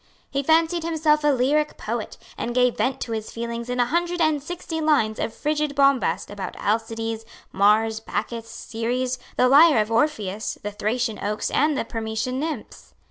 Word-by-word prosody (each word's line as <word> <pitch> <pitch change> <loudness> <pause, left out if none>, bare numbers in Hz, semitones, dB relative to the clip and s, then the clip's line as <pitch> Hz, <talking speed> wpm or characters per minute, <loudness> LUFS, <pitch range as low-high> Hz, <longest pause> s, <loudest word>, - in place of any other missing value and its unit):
He 275 - 0
fancied 325 +3 +2
himself 310 -2 +2
a - - +3
lyric 290 +3 +2
poet, - - -4 0.2
and 240 - -4
gave 250 -1 +3
vent 265 +1 0
to 230 - -4
his 220 -1 -3
feelings 235 +1 -5
in 250 0 -2
a 245 - +4
hundred 345 +5 -1
and 310 -3 +2
sixty 325 +1 -5
lines 285 -9 +2
of - - -1
frigid 300 +3 -1
bombast 275 -5 +2
about 205 -1 -6
Alcides, 225 +1 -2 0.3
Mars, 220 +3 +3
Bacchus, 230 +1 -4
Ceres, 245 +3 -3 0.2
the 250 - +5
lyre 295 +3 +7
of 215 +1 0
Orpheus, 220 -5 0
the 210 - -3
Thracian 220 +2 -2
oaks 210 +1 -2
and 300 0 +2
the - - -1
Permessian 225 +3 -3
nymphs. 315 +1 -6
250 Hz, 170 wpm, -24 LUFS, 225-300 Hz, 0.3 s, lyre